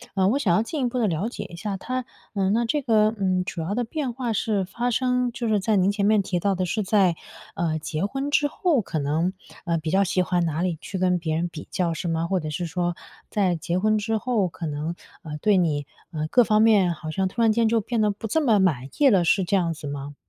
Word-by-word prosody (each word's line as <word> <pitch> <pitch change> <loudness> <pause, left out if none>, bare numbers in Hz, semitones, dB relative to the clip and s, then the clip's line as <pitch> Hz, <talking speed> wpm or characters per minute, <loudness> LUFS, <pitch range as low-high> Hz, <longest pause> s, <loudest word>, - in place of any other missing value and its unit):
呃， 190 -1 +3
我 245 +8 +2
想 200 -12 +2
要 180 - +3
进 280 +5 -3
一 245 - +1
步 250 - -2
地 225 - +2
了 180 +5 -1
解 210 -4 -6
一 175 - -10
下 195 +3 -4
他 255 +5 -3 0.3
嗯， 195 -2 +1
那 235 +2 +2
这 290 +5 0
个 220 -2 +3
嗯， 185 -2 0
主 170 - -4
要 170 +5 -2
的 245 +2 -1
变 275 +1 -3
化 240 -1 -3
是 205 -3 0
发 240 +6 -2
生 250 0 +1
就 235 0 -4
是 215 -2 +2
在 210 +2 +2
您 190 +1 +3
前 200 -1 0
面 210 0 +4
提 180 -2 -2
到 195 +1 +1
的 185 0 -1
是 215 +5 -1
在， 190 -4 +3 0.4
呃， 160 -2 -1
结 155 +3 -2
婚 270 +6 -3
之 290 0 +2
后， 310 - +1
可 165 -4 -3
能， 155 +6 0 0.3
呃， 170 -2 0
比 160 0 -3
较 195 +4 +3
喜 185 0 +1
欢 180 0 +1
哪 160 0 -1
里 175 -3 -1
去 195 - -5
跟 180 -1 +2
别 160 -2 -2
人 175 - 0
比 160 -3 -9
较 170 -2 0
是 170 +2 -3
吗？ 165 +1 -1
或 185 - +3
者 155 -2 -5
是 170 +4 -3
说 175 +1 -2 0.3
在 190 -4 +1
结 170 +2 -2
婚 215 +2 +2
之 220 +1 -1
后， 220 -4 0
可 165 +1 -7
能， 150 +3 -3 0.3
呃， 150 -2 -6
对 205 +6 +3
你， 155 -5 +1 0.3
呃， 155 -2 -3
各 245 - +6
方 215 0 +3
面 205 -5 +5
好 155 -1 -6
像 190 +3 0
突 230 +5 -1
然 225 - +5
间 230 +1 +2
就 230 0 +3
变 225 +1 -1
得 210 - +3
不 205 +2 -5
这 315 +9 +1
么 235 -8 +4
满 150 -10 +1
意 290 - +5
了， 195 -9 +5
是 185 +3 +3
这 185 +3 0
样 170 -3 +1
子 155 -2 -7
吗？ 145 0 -6
190 Hz, 285 characters per minute, -24 LUFS, 170-225 Hz, 0.4 s, 各